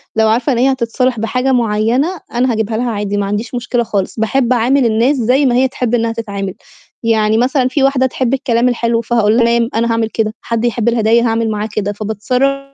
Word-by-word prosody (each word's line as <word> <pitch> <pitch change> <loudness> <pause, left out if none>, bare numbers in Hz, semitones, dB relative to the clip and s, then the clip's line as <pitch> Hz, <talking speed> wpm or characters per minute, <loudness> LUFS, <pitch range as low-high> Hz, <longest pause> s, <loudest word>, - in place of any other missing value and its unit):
لو 220 0 +3
عارفة 240 +6 +1
إن - - -1
هي 265 +2 +3
هتتصالح 250 -1 -1
بحاجة 250 +4 -1
معيّنة 240 - 0
أنا 245 +1 +1
هاجيبها 220 0 -2
لها 240 +1 -1
عادي 205 -1 -3
ما 200 - 0
عنديش 210 +5 -3
مشكلة 245 0 -1
خالص، 210 -1 -3
باحب 245 +3 +1
أعامل 250 +3 +2
الناس 235 +5 +2
زي 255 +4 +2
ما 245 - +2
هي 260 +1 +3
تحب 245 -2 -2
إنّها 230 -1 0
تتعامل. 200 -4 -5 0.5
يعني 220 -1 +2
مثلًا 255 +1 +1
في 265 +2 0
واحدة 270 -1 +2
تحب 260 -1 -1
الكلام 250 -3 +1
الحلو، 235 -1 0
فهاقول 225 -2 +1
لها 235 - +4
تمام، 235 0 +1
أنا 230 +1 +1
هاعمل 225 -1 0
كده. 220 -1 -2
حد 230 0 -2
يحب 235 -1 0
الهداية 230 0 +2
هاعمل 225 0 0
معاه 210 +1 -3
كده، 205 -1 -1
فباتصرّف 250 +7 -1
235 Hz, 205 wpm, -15 LUFS, 220-250 Hz, 0.5 s, لها